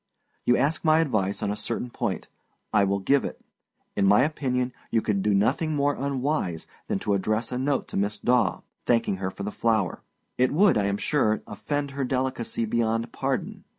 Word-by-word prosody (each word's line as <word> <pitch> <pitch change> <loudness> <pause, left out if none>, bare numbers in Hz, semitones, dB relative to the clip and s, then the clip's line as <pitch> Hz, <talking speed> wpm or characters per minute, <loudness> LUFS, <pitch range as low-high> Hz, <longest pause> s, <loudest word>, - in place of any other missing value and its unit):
You 120 - +5
ask 145 +5 +1
my 155 -1 +5
advice 110 -11 0
on 100 - 0
a - - -2
certain 120 +3 -4
point. 115 -6 -3 0.5
I 105 -2 +5
will 100 0 +1
give 135 +8 +2
it. - - -5 0.6
In 100 -1 +3
my 105 +5 +6
opinion 130 -4 -1 0.2
you 115 - +2
could 105 -3 0
do 105 - +1
nothing 150 +10 +1
more 145 0 +2
unwise 135 - -1 0.2
that 95 - -1
to 105 - 0
address 110 +4 0
a 125 - -2
note 135 0 0
to - - -4
Miss 100 +1 0
Daw, 120 -5 +2 0.3
thanking 115 -5 +2
her 95 0 -2
for 100 - -7
the 105 - -3
flower. 110 -6 0 0.4
It 130 0 +4
would, 195 +7 +5
I 105 - +2
am 100 0 0
sure, 110 -4 +1
offend 140 +8 -3
her 140 0 -2
delicacy 130 -3 -1
beyond 115 +1 0
pardon. - - -3
115 Hz, 190 wpm, -26 LUFS, 105-140 Hz, 0.6 s, my